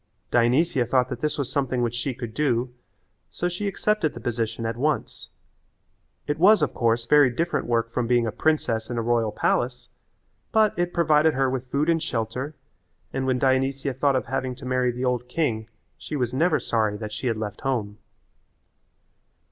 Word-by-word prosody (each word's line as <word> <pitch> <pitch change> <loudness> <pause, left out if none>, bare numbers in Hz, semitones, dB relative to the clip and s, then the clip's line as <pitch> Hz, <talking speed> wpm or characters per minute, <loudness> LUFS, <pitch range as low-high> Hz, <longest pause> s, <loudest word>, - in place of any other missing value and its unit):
Dionysia 125 +4 +3
thought 125 0 +2
that 125 -2 -5
this 150 -1 -1
was 140 -4 -3
something 130 -4 0
which 120 -1 -1
she 125 +1 -3
could 120 -3 -6
do, 125 -3 0 0.6
so 175 - -2
she 180 +4 -3
accepted 200 -4 0
the - - -6
position 115 -1 -2
at 115 0 -2
once. 145 +5 -2 1.0
It 145 +1 -2
was, 200 0 +6
of 150 - 0
course, 115 0 +1
very 145 +1 +6
different 165 +8 -1
work 115 -1 0
from 120 -1 -1
being 120 -1 +3
a 110 - -1
princess 115 -5 0
in 120 - -3
a - - +1
royal 115 -2 +1
palace 125 +3 -1 0.6
but 215 -1 +4
it 175 0 -1
provided 155 -3 +3
her 135 -1 +1
with 130 -1 -4
food 140 +4 0
and 165 -1 +2
shelter, 125 +1 -3 0.6
and 135 0 -1
when 130 -1 +2
Dionysia 135 +1 +1
thought 140 +1 +1
of 130 - 0
having 130 0 -2
to 130 +1 -11
marry 130 -1 +1
the 125 +2 -3
old 125 -1 -1
king 120 -7 -1 0.3
she - - -6
was 125 -3 -1
never 160 +4 +2
sorry 110 -3 0
that 105 0 -6
she 115 +4 -3
had 115 -2 0
left 105 -1 -5
home. 110 -6 -2
125 Hz, 185 wpm, -25 LUFS, 115-150 Hz, 1.0 s, was